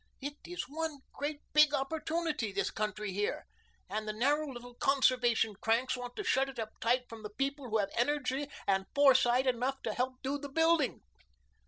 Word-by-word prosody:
It 285 +1 -4
is 355 0 -4
one 315 -1 -4
great 290 +1 -4
big 300 -1 +6
opportunity, 310 -3 -1
the 200 +1 0
country 210 -1 -2
here, 205 +2 -1 0.4
and 215 0 -3
the 215 - -2
narrow 285 +6 +1
little 245 -1 -9
conservation 245 -4 +3
cranks 230 +6 +1
want 245 -1 -7
to 415 - -4
shut 270 -6 +2
it 265 - -10
up 220 -2 -4
tight 245 +2 +2
from 225 -2 -10
the 210 - -6
people 275 +3 -3
who 220 - +2
have 200 -2 0
energy 275 +2 0 0.2
and 195 -1 +1
foresight 260 -3 +5
enough 255 +1 0
to 220 - -1
help 255 +2 -1
do 280 +2 -1
the 285 0 -7
building." 325 +2 +2
260 Hz, 180 wpm, -32 LUFS, 225-285 Hz, 0.4 s, big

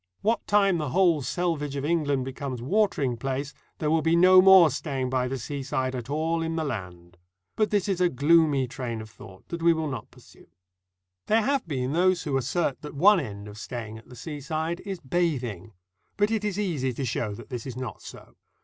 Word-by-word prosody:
What 225 +3 0
time 195 -4 +3
the 150 -3 -2
whole 175 -2 +3
selvage 150 -1 -2
of 140 0 -3
England 145 -5 0
becomes 135 -1 -5
watering 140 - +1
place, 135 +4 -3 0.2
there 150 -1 -1
will 160 0 +3
be 165 +2 +2
no 185 +2 +7
more 185 -4 +8
staying 130 -3 -3
by 125 -1 +1
the 135 +1 -3
seaside 130 0 -3
at 125 -1 -6
all 160 +3 0
in 165 0 -2
the 160 - -1
land. 90 - -6 0.4
But 215 -1 +1
this 205 -2 +1
is 190 -2 -1
a 180 - +4
gloomy 145 -1 +3
train 120 -2 -5
of 110 0 -11
thought 95 -2 -14
that 170 -1 -5
we 170 0 +5
will 160 -1 -2
not 130 -6 -6
pursue. - - -19 0.8
There 220 +1 +3
have 275 -4 0
been 130 -3 -2
those 180 +1 +2
who 145 -3 -2
assert 135 +3 -1
that 150 - -8
one 195 +7 +6
end 105 -7 -6
of 105 +1 -10
staying 110 -2 -6
at 115 - -20
the 125 - -11
seaside 155 +5 -4
is 190 -3 -4
bathing; 130 - -2 0.5
but 205 +1 +2
it 220 -2 0
is 205 -2 -2
easy 155 -11 -1
to 135 +3 -3
show 110 -3 -2
that 115 0 -12
this 125 0 -5
is 125 -2 -6
not 125 -6 -6
so. - - -12
145 Hz, 205 wpm, -26 LUFS, 125-170 Hz, 0.8 s, more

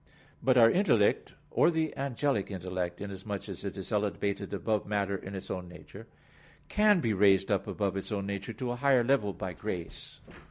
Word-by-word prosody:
But 130 0 +3
our 115 -1 +7
intellect, 120 - +2 0.2
or - - +4
the 160 -2 -1
angelic 135 -5 -1
intellect, 90 -2 -4
inasmuch 100 0 -5
as - - -7
it - - -5
is - - -6
elevated 100 -1 -1
above 105 +2 -1
matter 100 -1 0
in 95 +1 -7
its 95 - -6
own 90 -1 -5
nature, 90 - -12 0.6
can 210 -3 +4
be 115 -2 +1
raised 95 0 +4
up 100 - +1
above 100 -2 -1
its 95 +3 -5
own 100 -2 -2
nature 100 +2 -4
to 120 +3 -4
a 120 - -3
higher 135 -2 +4
level 115 -5 +2
by 95 -1 -5
grace. 90 -2 -6
100 Hz, 185 wpm, -30 LUFS, 95-120 Hz, 0.6 s, our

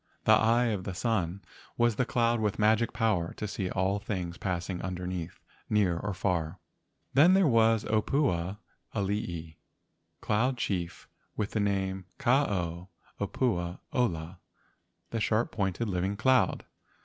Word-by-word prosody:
"The - - +4
Eye 115 +2 +4
of 95 -3 -3
the 95 -1 -5
Sun" 100 -4 -1 0.3
was 120 -2 +2
the 130 - +1
cloud 120 -2 +2
with 105 -2 0
magic 110 +2 +3
power 105 -8 0
to 105 - -4
see 95 -2 -3
all 95 +2 0
things 90 -4 -4
passing 90 -1 -2
under¬ 90 -1 -4
neath 90 -2 -5 0.3
near 100 -5 +3
or 100 +3 -3
far. 85 -4 -1 0.6
Then 165 +8 +6
there 195 -1 +5
was 115 -3 +4
the - - -7
opua 100 - 0 0.4
alii, 90 -6 -3 0.6
cloud 125 +5 +1
chief 90 -7 -3 0.3
with 105 -1 -1
the 110 - -1
name 95 -2 -1
Ka 135 +2 +3
ao 90 -3 -3 0.3
opua 90 -5 -1 0.2
ola 90 -8 -1 0.7
(the 115 - -1
sharp 110 +2 +1
pointed 100 +2 -1
living 95 +1 -1
cloud). 130 +3 +2
100 Hz, 145 wpm, -29 LUFS, 90-115 Hz, 0.7 s, Then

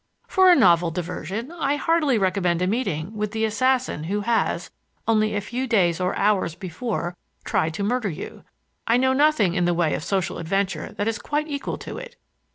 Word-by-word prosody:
For 375 -1 +5
a - - +7
novel 175 - +5
diversion 180 - -5
I 290 -5 0
heartily 300 -4 +2
recommend 185 -3 +1
a - - +3
meeting 195 -3 -2
with 210 0 -3
the 220 0 +1
assassin 255 - 0
who 205 +4 -1
has, 230 +2 0 0.4
only 215 -1 +2
a 205 - 0
few 245 +5 -3
days 180 -8 +2
or 180 - 0
hours 195 -5 +1
before, 180 0 -4 0.3
tried 160 +1 0
to 200 - -2
murder 230 0 0
you. 155 - -8 0.4
I 230 - +4
know 260 +1 +3
of 260 - +1
nothing 285 - +3
in 180 -1 +1
the 175 0 +2
way 165 -3 +1
of - - -3
social 190 -1 -1
adventure 195 +3 -1
that 205 - -2
is 225 0 -1
quite 300 +1 -2
equal 285 -2 -4
to - - -7
it. - - -10
210 Hz, 195 wpm, -23 LUFS, 180-255 Hz, 0.4 s, a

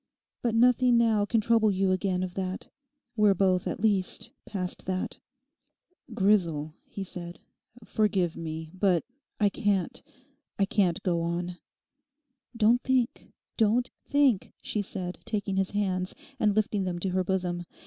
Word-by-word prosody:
But 235 -2 0
nothing 245 +1 +5
now 220 -3 +3
can 220 +2 +1
trouble 225 0 +3
you 190 -1 +1
again 185 -1 0
of 180 -1 -4
that. 185 0 -4 0.5
We're 210 -3 +4
both 185 -1 +2
at - - -3
least 200 -4 +1 0.2
past 185 -3 -4
that.' 185 0 -2 0.9
'Grisel,' 180 -8 +2
he 195 - -7
said, 175 -2 -6 0.5
'forgive 190 -6 +1
me, 160 -1 -6
but 185 -3 +2 0.4
I 205 -2 +4
can't—I 230 - -3
can't 190 -4 +1
go 175 -3 +1
on.' 175 +1 -2 1.0
'Don't 230 +2 +4
think, 255 -2 0 0.3
don't 230 +3 +2 0.2
think,' 280 -8 +2
she 210 - -1
said, 185 -3 -4
taking 200 -3 -1
his 195 -1 +1
hands, 185 -3 -1 0.2
and 210 -2 +2
lifting 210 -2 +1
them 180 -2 -2
to 185 +2 -1
her 185 0 +1
bosom. 180 -2 -1
195 Hz, 140 wpm, -28 LUFS, 180-215 Hz, 1.0 s, nothing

